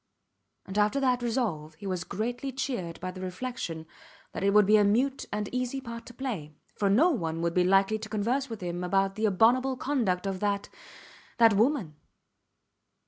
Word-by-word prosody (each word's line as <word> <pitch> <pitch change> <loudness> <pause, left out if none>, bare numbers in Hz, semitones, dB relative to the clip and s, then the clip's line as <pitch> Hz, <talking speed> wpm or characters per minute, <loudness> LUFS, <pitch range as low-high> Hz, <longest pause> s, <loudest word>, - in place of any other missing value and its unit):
And 195 +2 -2
after 210 +6 +2
that 255 -2 +2
resolve 210 -11 -2
he 180 - -12
was 185 -3 -2
greatly 245 +6 -3
cheered 240 -11 -4
by 185 - -3
the 185 0 -9
reflection 180 -4 -5 0.5
that - - -5
it 200 - +4
would 210 0 +5
be 215 +2 +6
a 210 - +5
mute 250 +7 +1
and 210 0 -2
an - - -12
easy 255 +1 -1
part 235 -3 -8
to 245 - -10
play, 205 - -5 0.2
for 200 - +1
no 295 - +5
one 165 - -2
would 170 0 0
be 180 - +3
likely 195 +3 +3
to 220 0 -8
converse 235 +6 -1
with 225 -3 -7
him 175 0 -3
about 195 +1 +1
the 215 +2 0
abominable 250 +6 +3
conduct 230 -10 0
of 195 -1 -2
that 200 0 -1 0.8
woman. 210 - +1
210 Hz, 185 wpm, -28 LUFS, 185-250 Hz, 0.8 s, be